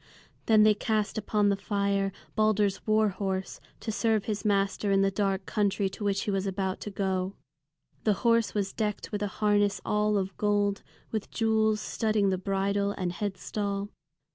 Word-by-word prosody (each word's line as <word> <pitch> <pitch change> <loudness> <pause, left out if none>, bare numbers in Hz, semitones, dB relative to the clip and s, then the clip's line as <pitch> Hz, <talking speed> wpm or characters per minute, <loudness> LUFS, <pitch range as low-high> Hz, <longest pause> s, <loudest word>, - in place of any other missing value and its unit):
Then 215 -2 +6
they 215 0 +6
cast 215 +1 -1
upon 210 -1 +1
the 200 - +3
fire 200 -1 0 0.2
Balder's 210 -2 +1
war 215 0 +4
horse, 190 0 -3 0.2
to 220 - -3
serve 220 -1 +1
his 210 -2 -3
master 200 -1 +1
in 195 0 +4
the 195 - +2
dark 195 -1 -1
country 200 -2 0
to 200 - -8
which 200 -1 0
he 205 - -1
was 195 0 -1
about 190 0 -2
to - - -5
go. 190 -1 -2 0.7
The 215 - +3
horse 230 -1 +3
was 200 -2 -1
decked 210 -2 -3
with 205 -1 -3
a 205 - 0
harness 205 0 +1
all 210 0 +2
of 190 0 -2
gold, 205 -1 +1 0.3
with 220 -2 -3
jewels 220 -1 +1
studding 215 -3 +1
the 185 - -1
bridle 200 +1 0
and 180 -3 -2
headstall. 200 +1 -3
205 Hz, 170 wpm, -28 LUFS, 195-215 Hz, 0.7 s, Then